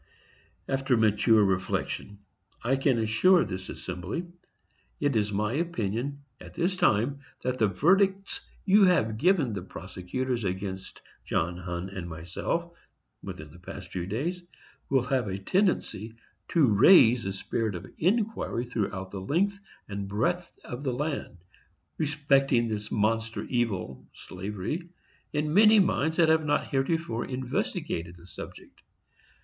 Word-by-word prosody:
After 135 -1 +1
mature 110 0 +4
reflection, 95 +1 -2 0.5
I 130 +3 +2
can 135 -2 +2
assure 135 +12 +4
this 95 -2 -6
assembly 90 - -5 0.7
it 145 -3 +1
is 105 -1 +1
my 105 +3 0
opinion 140 - -2 0.2
at - - -12
this 180 +2 +1
time 130 - +2 0.2
that 125 0 -1
the 110 - +4
verdicts 190 - +2 0.2
you 200 +1 +6
have 115 -12 +2
given 160 - +3
the 100 - -3
prosecutors 95 +7 -4
against 95 0 -4 0.2
John 85 +2 -1
Hunn 90 +1 -5
and 95 -3 -6
myself, 90 - -3 0.5
within - - -8
the 85 - -14
past 90 0 -9
few 90 -1 -3
days, 155 - -2 0.5
will 135 -2 +3
have 130 -3 0
a 95 0 -2
tendency 115 - 0 0.3
to 165 -4 +4
raise 115 - +6
a 95 - -1
spirit 105 +2 -2
of 85 - -6
inquiry 200 - 0
throughout 100 -5 -3
the 95 - -5
length 195 - 0 0.3
and 100 -1 -4
breadth 170 - -1
of 125 +3 -7
the 130 -3 0
land, 145 - -3 0.6
respecting 140 -5 +2
this 105 -1 -4
monster 115 +1 0
evil 95 - -2
(slavery), 105 - -5 0.4
in 150 0 -1
many 215 +3 +7
minds 160 -4 +1
that 165 -2 +5
have 160 0 +4
not 145 -1 +1
heretofore 135 -3 0
investigated 130 - -3
the 85 - -16
subject. 90 - -10
120 Hz, 135 wpm, -28 LUFS, 100-155 Hz, 0.7 s, many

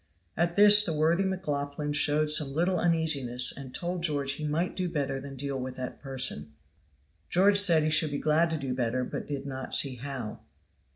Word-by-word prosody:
At 170 +1 -1
this 210 0 +7
the 165 - -2
worthy 165 +5 +1
McLaughlan 150 -6 -3
showed 150 +1 +2
some 150 -3 0
little 175 +2 0
uneasiness 140 -7 0
and 135 -2 -10
told 175 +4 -4
George 145 -4 0
he 145 +2 -5
might 165 +5 -2
do 180 -1 -3
better 140 -4 -3
than 135 0 -10
deal 135 0 -4
with 130 0 -6
that 130 -1 -7
person. 130 - -3 0.8
George 200 +3 +4
said 170 -6 +6
he 155 - 0
should 155 0 +4
be 145 - -4
glad 155 +3 +1
to 160 - -2
do 135 -3 -4
better, 125 0 -2
but - - -7
did 140 -1 -5
not 130 -1 -1
see 135 -3 +3
how. 130 -4 -7
150 Hz, 190 wpm, -27 LUFS, 135-170 Hz, 0.8 s, this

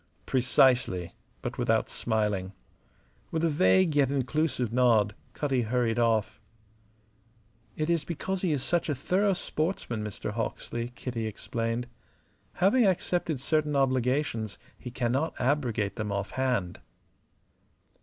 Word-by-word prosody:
"Precisely" 125 -8 +3 0.3
but - - -4
without - - +2
smiling. 105 -4 -1 0.8
With 160 0 -2
a 165 - +3
vague 145 - +4
yet 140 -3 +4
inclusive 135 -3 0
nod 115 -5 +4 0.2
Cutty 135 -4 0
hurried 120 0 0
off. 110 -2 +1 1.3
"It 155 - -1
is 170 -2 +1
because 180 +3 -3
he 180 - +1
is 140 -4 0
such 175 -2 0
a 145 - +1
thorough 190 +9 +1
sportsman. 155 - -2
Mr. 105 0 -5
Hawksley," 115 +2 -3
Kitty 115 -4 -4
explained. 115 +2 -3 0.7
"Having 205 +5 +4
accepted 175 -5 0
certain 150 +2 0
obligations 130 -4 0 0.2
he 125 - -8
cannot 125 +5 -1
abrogate 120 -7 0
them 105 -2 -2
off 100 0 -2
hand." 125 -9 -1
125 Hz, 120 wpm, -28 LUFS, 110-150 Hz, 1.3 s, vague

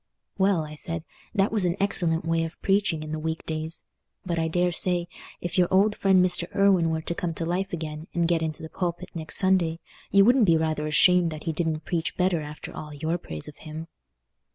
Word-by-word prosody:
"Well," 190 -4 +3
I 150 - -9
said, 165 +1 -4 0.3
"that 195 0 +2
was 215 -3 +3
an 175 -1 +1
excellent 170 -4 0
way 165 0 +1
of 165 +1 -6
preaching 195 -5 +2
in 155 - -7
the 155 - -3
weekdays; 160 0 -3 0.4
but 170 -2 -1
I 160 - +1
daresay, 175 +1 +1 0.4
if 175 +1 -2
your 180 - +5
old 200 +3 +3
friend 190 -2 +4
Mr. 175 -1 +1
Irwine 195 -4 +4
were 160 0 -2
to 170 - -2
come 170 -1 -3
to 165 - -3
life 185 +3 -1
again, 155 -1 -5
and 170 -1 +1
get 170 -1 +2
into 160 -1 -3
the 160 - -7
pulpit 180 +1 -4
next 160 -2 0
Sunday, 180 -4 +2 0.3
you 195 0 +6
would 245 +1 +5
be 165 -5 +5
rather 155 -1 -1
ashamed 175 +3 +5
that 155 -1 -7
he 165 - -1
didn't 160 -1 -2
preach 165 -2 -2
better 180 -3 +2
after 150 0 -8
all 150 - -7
your 160 +4 -2
praise 75 - -3
of 150 - -11
him." 160 +1 -8
165 Hz, 210 wpm, -26 LUFS, 160-180 Hz, 0.4 s, you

